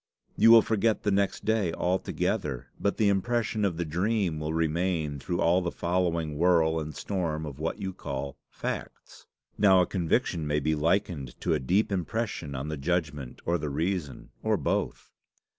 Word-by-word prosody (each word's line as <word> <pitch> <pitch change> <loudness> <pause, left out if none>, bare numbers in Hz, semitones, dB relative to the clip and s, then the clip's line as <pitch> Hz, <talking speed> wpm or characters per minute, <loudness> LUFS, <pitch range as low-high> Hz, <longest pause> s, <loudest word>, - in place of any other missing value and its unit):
You 115 - +6
will 115 -1 +9
forget 110 0 +1
the 105 - +1
next 100 0 0
day 110 -6 +1
altogether, 80 -7 -1
but 100 - 0
the 110 - +3
impression 110 +2 0
of 95 -5 0
the 85 - -1
dream 90 0 0
will 75 0 -3
remain 80 -2 0
through 85 +5 -3
all 90 +3 +4
the 85 - -1
following 85 -4 -1
whirl 80 -2 +3
and 75 -2 -6
storm 80 -6 -2
of 70 -2 -8
what 80 +1 -2
you 95 -2 -4
call 70 -5 -5
facts. - - -6 0.3
Now 95 -3 +6
a 90 - +4
conviction 85 -2 0
may 75 0 +1
be 80 +2 0
likened 80 -4 -1
to - - +1
a - - +1
deep 95 +12 +1
impression 95 -5 -2
on 70 +3 -4
the 75 0 -3
judgment 75 -4 -2
or 85 0 +1
the 75 - -3
reason, 80 0 -3
or - - +1
both. - - -2
85 Hz, 175 wpm, -28 LUFS, 75-95 Hz, 0.3 s, will